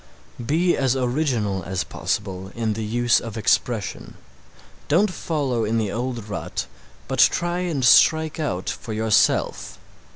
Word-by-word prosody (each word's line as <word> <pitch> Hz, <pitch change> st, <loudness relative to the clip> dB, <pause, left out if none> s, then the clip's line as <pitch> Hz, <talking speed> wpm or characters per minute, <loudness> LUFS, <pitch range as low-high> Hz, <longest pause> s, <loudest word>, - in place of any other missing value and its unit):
Be 170 Hz, +8 st, +2 dB
as 135 Hz, -2 st, +1 dB
original 125 Hz, -7 st, 0 dB
as 95 Hz, +1 st, -2 dB
possible 95 Hz, -2 st, -4 dB
in 115 Hz, -2 st, -1 dB
the 110 Hz, +1 st, -4 dB
use 120 Hz, +2 st, +2 dB
of 115 Hz, -1 st, -7 dB
expression. 110 Hz, -1 st, -1 dB, 0.7 s
Don't 185 Hz, +7 st, +3 dB
follow 140 Hz, -9 st, -2 dB
in 110 Hz, +2 st, 0 dB
the 105 Hz, -3 st, -1 dB
old 120 Hz, -2 st, -4 dB
rut 100 Hz, -, -4 dB, 0.4 s
but -, -, -3 dB
try 175 Hz, +1 st, +3 dB
and 165 Hz, -8 st, -1 dB
strike 160 Hz, +6 st, +5 dB
out 95 Hz, -, -3 dB
for 110 Hz, -, -4 dB
yourself. 110 Hz, 0 st, +1 dB
120 Hz, 135 wpm, -23 LUFS, 105-150 Hz, 0.7 s, strike